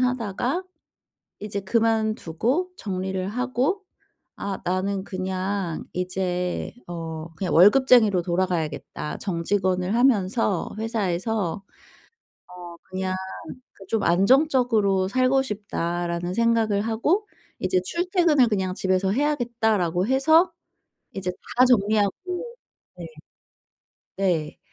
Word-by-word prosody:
하다가 250 - -1 0.8
이제 205 -1 -4
그만두고 225 - 0
정리를 190 -1 -3
하고 255 - -1 0.5
'아 195 -1 -4
나는 190 +2 -1
그냥 185 -1 -3
이제 180 0 -2
어 165 -1 -6
그냥 185 +2 -2
월급쟁이로 210 0 +6
돌아가야겠다. 170 -4 -2
정직원을 185 +2 -1
하면서 215 -5 +2
회사에서 210 -3 -2 0.8
어 175 -1 -10
그냥 185 0 -2 0.6
그 195 - -14
좀 220 -2 0
안정적으로 215 - +3
살고 255 +4 +2
싶다.'라는 175 -5 -3
생각을 225 -2 +2
하고 265 - 0 0.3
'이제 185 - +1
출퇴근을 340 - +2
그냥 190 -4 -1
집에서 190 0 +1
해야겠다.'라고 220 - 0
해서 315 +7 +4 0.6
이제 185 -2 -3 0.3
다 250 - +7
정리하고 210 -4 +3 0.9
네. 170 -2 -7 1.1
네. 175 -6 -1
200 Hz, 230 characters per minute, -24 LUFS, 185-240 Hz, 1.1 s, 다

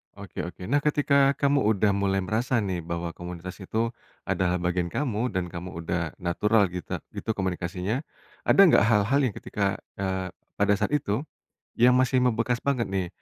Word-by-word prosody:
Oke 100 -1 -9
oke. 90 - -10
Nah, 145 - +4
ketika 140 -1 +3
kamu 140 0 +2
udah 105 0 +2
mulai 100 -1 0
merasa 115 +5 0
nih, 95 -3 -2
bahwa 85 0 -4
komunitas 90 +2 -8
itu 110 +4 -1 0.3
adalah 90 -1 0
bagian 90 0 0
kamu, 115 - -1
dan 90 -2 -2
kamu 90 -1 -7
udah 85 -1 -2
natural 100 +3 +2
gitra 90 -1 -5
gitu, - - -7
komunikasinya, 95 +3 -2 0.5
ada - - +4
nggak 180 - +6
hal-hal 110 +5 +3
yang 115 - -2
ketika 100 -2 -1 0.2
eee, 95 -1 -2 0.3
pada 100 0 +3
saat 105 +7 -1
itu 115 -5 -1 0.6
yang 125 +1 +6
masih 130 0 +3
membekas 120 0 +1
banget 130 -5 0
nih, 95 -2 -1
100 Hz, 165 wpm, -26 LUFS, 90-125 Hz, 0.6 s, nggak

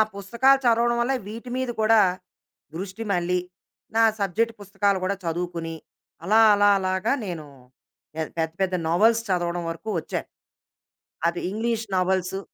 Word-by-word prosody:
పుస్తకాలు 235 +7 +3
చదవడం 235 0 +3
వల్ల 250 +3 +1
వీటి 230 +4 -8
మీద 260 -1 -2
కూడా, 220 0 +5 0.7
దృష్టి 195 +5 -5
మళ్ళీ, 180 0 +1 0.6
నా 225 - +5 0.2
సబ్జెక్ట్ 220 +4 0
పుస్తకాలు 200 -1 0
గూడా 200 +2 0
చదువుకుని, 170 -1 -3 0.5
అలా 215 +4 +4
అలా 205 0 +4
అలాగ 185 0 -2 0.2
నేను, 170 -5 -5 0.7
పె 160 - -4 0.2
పెద్ద 160 -1 0
పెద్ద 190 -1 +1
నోవల్స్ 225 +7 +3
చదవడం 175 -1 0
వరకు 190 +6 -7
వచ్చాను. - - -5 1.0
అది 170 +1 -1
ఇంగ్లీషు 225 +1 -2
నోవల్సు. 185 +1 0
195 Hz, 130 wpm, -24 LUFS, 175-225 Hz, 1.0 s, కూడా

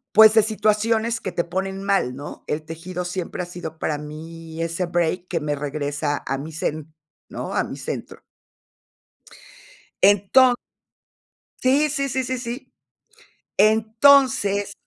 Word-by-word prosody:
pues, 220 0 +9
de 220 -2 +6
situaciones 220 +2 +1
que 190 -5 -5
te 170 - 0
ponen 190 +2 -4
mal, 195 -11 +1
¿no? 145 +2 -9
El 150 +1 -2
tejido 170 +3 -6
siempre 180 0 -4
ha - - -5
sido 175 -2 -8
para 150 - -1
mí 160 +2 -8
ese 165 +2 -1
break 175 +1 -1
que 170 -2 -2
me 150 -1 -1
regresa 145 0 -2
a 135 - -1
mi 155 +3 -7
zen, 155 0 -4 0.3
¿no?, - - -6
a - - +1
mi - - -7
centro. - - -6 1.8
Enton 205 +6 +6 1.1
Sí, 280 +4 +3
sí, 275 -1 -1
sí, 260 +1 -1
sí, 255 +1 -2
sí. 245 +2 -7 0.8
Entonces 220 0 +4
185 Hz, 135 wpm, -23 LUFS, 160-220 Hz, 1.8 s, pues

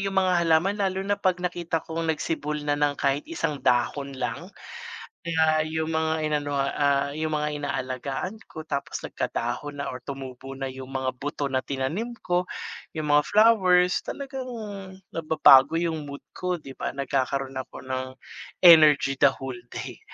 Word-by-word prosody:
yung 195 0 0
mga 180 -2 +3
halaman 165 +5 +3
lalo 190 -1 0
na 205 - +2
'pag 185 -3 0
nakita 175 -2 -2
kong 165 0 -1
nagsibol 150 -1 -2
na 145 - +2
ng 145 -1 0
kahit 140 +1 +1
isang 160 -3 -3
dahon 135 +2 +1
lang, - - -4 0.9
ah, 155 0 +4
yung 160 0 -2
mga 160 0 +1 0.2
inano, 145 -1 -1
ah, 140 0 +1
yung 155 +1 -2
mga 150 0 0
inaalagaan 135 - -3
ko, 155 - -8
tapos 140 -3 -4
nagkadahon 140 +5 -3
na - - -3
or 125 - -6
tumubo 135 0 -7
na 135 0 -4
yung 130 0 -9
mga 130 -1 0
buto 145 0 -3
na 130 - +1
tinanim 155 - -3
ko, 180 0 0 0.5
yung 155 -2 -3
mga 150 0 +6
flowers, 185 -5 +5
talagang 265 -2 -5 0.6
nababago 155 -3 +6
yung 160 -3 -1
mood 140 0 -8
ko, 180 0 -2
di 145 -4 -11
ba, - - -3
nagkakaroon 135 -1 -1
ako 130 - -7
ng 130 0 -3 0.6
energy 150 -5 +7
the 140 - +7
whole 130 -2 -6 0.2
day. - - -6
150 Hz, 160 wpm, -26 LUFS, 135-170 Hz, 0.9 s, energy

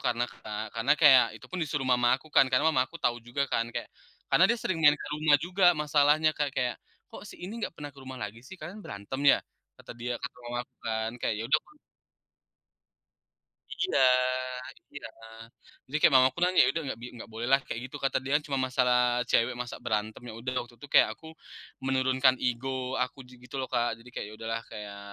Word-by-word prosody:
karena, 120 0 0
Kak. 110 0 -6
Karena 115 +6 +2
kayak 135 -6 +7
itu - - -14
pun 185 - -4
disuruh 140 -3 -2
mama 125 0 +3
aku 155 - -18
kan 135 - +6
karena 130 +3 +2
mama 140 -5 +3
aku 170 - -11
tahu 120 0 0
juga 120 +4 -2
kan. 115 0 0
Kayak - - -4 0.4
karena 185 - +6
dia 235 +2 +1
sering 170 -3 -2
nyari 150 -1 +7
ke - - -7
rumah 150 -1 +4
juga 180 +2 0
masalahnya, 150 +1 +3
Kak. 145 -1 0
Kayak, 125 -2 -1 0.3
"Kok - - -10
si - - -11
ini 185 +4 -6
nggak - - -2
pernah 145 -2 -8
ke 140 - -19
rumah 130 -1 -9
lagi 105 +3 -6
sih, 190 - -10
kalian 175 +7 -8
berantem 100 +7 -6
ya?" - - +7 0.4
Kata - - -13
dia 120 +1 -3
kata 125 - -6
mama 120 0 -3
aku 125 +1 -25
kan, 110 -1 -1
kayak 115 - -1
ya - - -2
udah 150 - +5
aku - - -25 2.0
Iya 370 - -1 1.0
iya. 140 - -7 0.8
Jadi 145 +4 -3
kayak - - +6
mama 130 0 +7
aku - - -16
nanya, 180 +1 +4
"Ya - - +3
udah 165 - -2
nggak" 125 - -4
bi - - -6
"nggak 115 - -10
bolehlah," 120 +5 +2
kayak 115 - -4
gitu - - -9
kata 135 - +2
dia. 135 +2 0
"cuman 135 -2 -1
masalah 125 -1 +3 0.3
cewek 120 +2 +3
masa 125 -1 -5
berantem." 110 +2 -2
Ya - - -7
udah, 130 +2 -3
waktu 120 - -18
itu 145 - -11
kayak - - +7
aku, 160 - -15 0.6
menurunkan 130 0 +3
ego 125 +2 -1 0.3
aku - - -4
ji 125 - -15
gitu 125 - -15
loh, 130 - -4
Kak. 120 -1 +1
Jadi 115 +2 -16
kayak - - -5
ya - - -11
udahlah 115 0 -3
kayak 105 -1 -8
130 Hz, 215 wpm, -28 LUFS, 120-145 Hz, 2.0 s, kayak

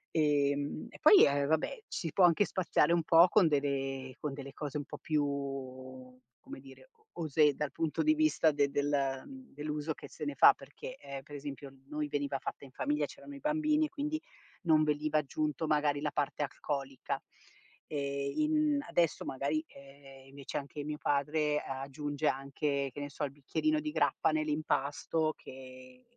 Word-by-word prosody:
Ehm, 145 -2 +1
e - - -13
poi, 410 - +9
ehm, 140 0 +1
vabbè, 160 - 0
ci 170 -5 -4
può 190 - +4
anche 175 +4 +4
spaziare 170 -4 +2
un 170 - +3
po' 165 +3 +7
con 190 -1 +5
delle 135 -3 -1
con 150 - -3
delle 140 -1 -8
cose 145 0 -4
un 145 - -3
po' - - -9
più, 150 -2 +1 1.2
come - - -10
dire, 135 - -15
o 440 -1 -33 0.2
osé 150 -1 +4
dal 150 0 -2
punto 160 - -1
di 310 0 +5
vista 310 - +3
de 145 -1 +2
del 140 -2 0 0.3
dell'uso 150 +1 -3
che - - -10
se - - -9
ne 145 -1 -3
fa, - - +8
perché, 145 - -10
ehm, 140 - -8
per 145 - -14
esempio, 140 -1 -7 0.2
noi 150 0 -2
veniva 145 -1 -1
fatta - - -6
in - - -13
famiglia, 295 - 0
c'erano 285 - -11
i - - -9
bambini 305 +1 +2
e - - -5
quindi 300 +2 -3 0.4
non 155 -2 +4
veniva 150 0 +1
aggiunto 150 +1 -2
magari 150 -1 +2
la 150 0 -1
parte 145 +1 -1
alcolica. 135 -2 -3 0.7
E 140 -1 -2
in 305 -1 +2
adesso 170 -2 +1
magari, 140 +4 -1
ehm, 135 -1 -15
invece 140 0 -6
anche 145 +1 -7
mio 150 +1 -4
padre 150 +1 +1
aggiunge 140 +3 -3
anche, 140 +1 -1
che - - -7
ne 145 - -4
so, 145 - -5
il 140 - -5
bicchierino 305 - 0
di 305 0 -3
grappa - - +2
nell'impasto 155 0 0
che 130 -1 -12
145 Hz, 170 wpm, -32 LUFS, 140-160 Hz, 1.2 s, poi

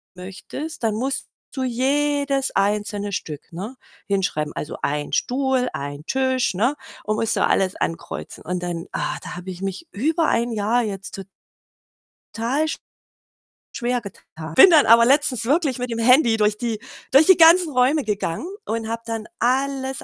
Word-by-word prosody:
möchtest, 200 - -8
dann 220 -2 +1
musst 265 +4 -2 0.3
du 265 -2 -3
jedes 275 +2 0
einzelne 205 0 0
Stück, 155 -5 -6
ne, 205 +10 -7 0.3
hinschreiben. 180 -7 -1
Also, 150 - -5
1 145 +1 -2
Stuhl, 260 -1 0
1 145 +1 -6
Tisch, 260 -2 0
ne, 240 +10 +1 0.3
und 215 - -1
musst 225 - 0
du - - +2
alles 190 -1 +1
ankreuzen. 165 - -5
Und 180 0 -3
dann, 170 -1 -4
ah, - - -2
da - - -7
habe 180 +1 -8
ich 180 0 -10
mich 195 - -5
über 315 - 0
1 235 +1 +1
Jahr 225 +3 +1
jetzt 195 -3 -5
to 195 - -7 1.1
tal 250 +7 0 1.1
schwergetan. 240 -5 -3 0.3
Bin 385 - +9
dann 315 -4 +6
aber 230 +1 +7
letztens 265 -3 +2
wirklich 285 -2 +1
mit 250 - -3
dem 230 - -3
Handy 235 0 +4
durch 210 0 +2
die 230 -3 -2 0.3
durch 275 +4 +7
die 375 +1 +6
ganzen 335 0 +6
Räume 265 +4 +3
gegangen 210 - -3 0.2
und 225 0 -3
habe 230 0 -3
dann 225 -1 -4
alles 265 +1 0
235 Hz, 160 wpm, -22 LUFS, 200-270 Hz, 1.1 s, Bin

